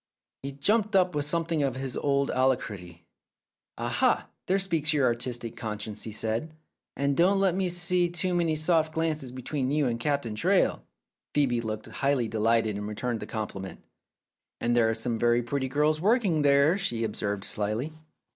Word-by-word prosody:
" - - -65
He 140 - -5
jumped 210 +9 +1
up 180 -2 +4
with 145 -1 -1
something 165 0 0
of 135 -3 0
his 130 -1 -4
old 140 -1 +1
alacrity. 100 -10 -1 0.7
"Aha, - - +1 0.2
there 190 - +3
speaks 165 -6 +1
your 145 -3 +2
artistic 120 -1 -2
conscience," 105 -2 -5
he 110 - -6
said. 115 +9 -1 0.4
"And 140 0 +1
don't 190 +5 +4
let 195 -2 +3
me 185 0 0
see 175 0 +1
too 175 +1 -2
many 170 -2 +1
soft 155 0 +1
glances 155 -5 -1
between 130 +1 -3
you 145 +1 +1
and 115 -2 -1
kind 145 +5 0
Captain 140 -6 -2
Traill." 105 - +2 0.6
Phcebe 125 -5 +2
looked 110 -1 -4
hugely 135 -4 +1
delighted 110 -1 +1
and 105 0 -4
returned 115 +2 -3
the 105 - -7
compliment. 100 -3 -6 0.8
"And 120 0 +1
there 115 -2 +4
are 110 - 0
some 115 0 -1
very 120 +1 +3
pretty 130 +2 -2
girls 150 +3 +1
working 200 -6 +2
there," 140 +5 +4
she 115 -10 -1
observed 105 -2 -2
slyly. 110 +9 -1
135 Hz, 175 wpm, -27 LUFS, 115-160 Hz, 0.8 s, up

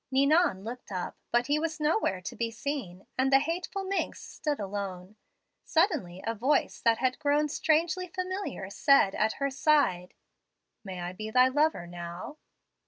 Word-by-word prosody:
"Ninon 275 - +3
looked 240 0 -8
up, 180 -2 -4 0.2
but 240 0 +3
he 290 +3 +1
was 315 0 -3
nowhere 300 - +1
to 185 - -6
be 230 -1 -1
seen, 225 -7 -5
and 265 +1 +3
the 270 - +8
'hateful 355 +6 -2
minx' 390 +1 -2
stood 295 -2 -3
alone. 195 -1 -5 0.5
Suddenly 305 - 0
a 225 - 0
voice 260 +7 +1
that 230 -1 +3
had 255 +1 0
grown 295 0 +2
strangely 325 +5 +1
familiar 370 - -4
said 275 -4 +4
at 215 +1 +1
her 275 0 -2
side, 265 - +2 0.7
'May 185 -3 -6
I 175 +1 -4
be 215 +3 -6
thy 255 +3 +5
lover 295 - +1
now?' 175 - -7
260 Hz, 160 wpm, -29 LUFS, 195-310 Hz, 0.7 s, the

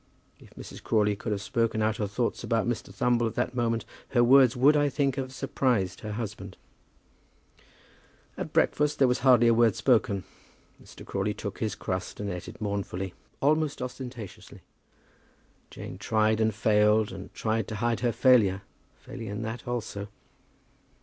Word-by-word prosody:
If - - -16
Mrs. - - -10
Crawley 105 -2 +2
could 105 - -5
have 105 0 -2
spoken 115 -1 0
out 110 0 0
her 105 - -1
thoughts 115 +4 -2
about 115 0 0
Mr. 120 -3 -3
Thumble 120 -1 +1
at 110 - -6
that 125 0 -1
moment, 115 -2 -1 0.2
her 120 -2 +3
words 130 0 +6
would, 140 +5 +5
I 145 -1 +3
think, 140 -1 0
have 130 -1 -4
surprised 125 -8 -1
her 105 -1 -6
husband. 110 -2 -6 1.8
At - - -5
breakfast 150 0 +2
there 135 - +4
was 125 0 +1
hardly 125 -3 +5
a 115 - +5
word 115 -1 +4
spoken. 105 -6 +2 0.6
Mr. - - -13
Crawley 100 +1 -2
took 100 -2 -6
his 110 -2 -2
crust 95 -3 -4
and 100 -1 -3
eat 90 - -7
it - - -10
mournfully, 100 -3 -3 0.3
almost 150 +1 +1
ostentatiously. 125 -4 -8 1.1
Jane - - -9
tried 110 0 +1
and 110 -2 +1
failed, 105 0 +3
and 95 0 -9
tried 110 -2 -1
to 110 - -5
hide 115 0 0
her 120 +1 +1
failure, 105 -6 +4 0.3
failing 115 - -9
in 105 +2 -4
that 115 +2 -6
also. 110 -4 -4
115 Hz, 165 wpm, -27 LUFS, 105-125 Hz, 1.8 s, words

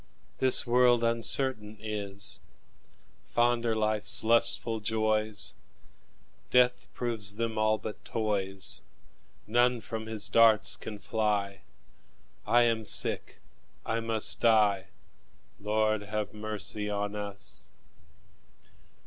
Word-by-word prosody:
This 130 -1 +6
world 120 -1 +3
uncertain 115 -1 +1
is: 100 -2 -4 0.9
Fond 120 0 +1
are 115 - 0
life's 110 0 +2
lustful 115 0 +2
joys, 110 0 -1 1.0
Death 125 0 +2
proves 110 -5 0
them 115 0 -3
all 110 0 +2
but 105 +1 -9
toys. 100 -4 -2 0.6
None 120 +2 +1
from 110 -1 -7
his 110 -2 0
darts 110 0 +4
can 105 - -8
fly; 100 -2 -2 0.9
I 120 +1 +4
am 115 -1 0
sick, - - +1 0.4
I 115 - -2
must 115 -1 +2
die 105 -4 +2 0.7
Lord, 110 +1 0
have 105 0 -5
mercy 105 -1 -5
on 105 0 -3
us! 100 -1 -7
110 Hz, 100 wpm, -28 LUFS, 105-115 Hz, 1.0 s, This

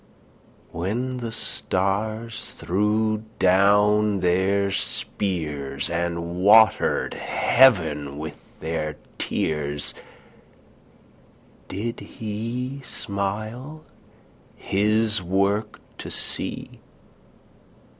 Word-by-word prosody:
When 120 +9 -2
the 120 -2 -4
stars 110 +3 -2
threw 105 +3 +1
down 100 +2 +4
their 95 +2 +2
spears, 75 -9 -2
And 85 0 -2
watered 110 +1 +5
heaven 80 - +3
with 80 +1 -6 0.2
their 75 -2 -2 0.2
tears, 75 -2 -1 1.7
Did 115 +5 -4
he 115 +5 -5
smile 110 +9 -4 0.7
his 105 +1 +1
work 100 +4 0 0.2
to - - -6
see? - - -5
100 Hz, 65 wpm, -24 LUFS, 85-110 Hz, 1.7 s, watered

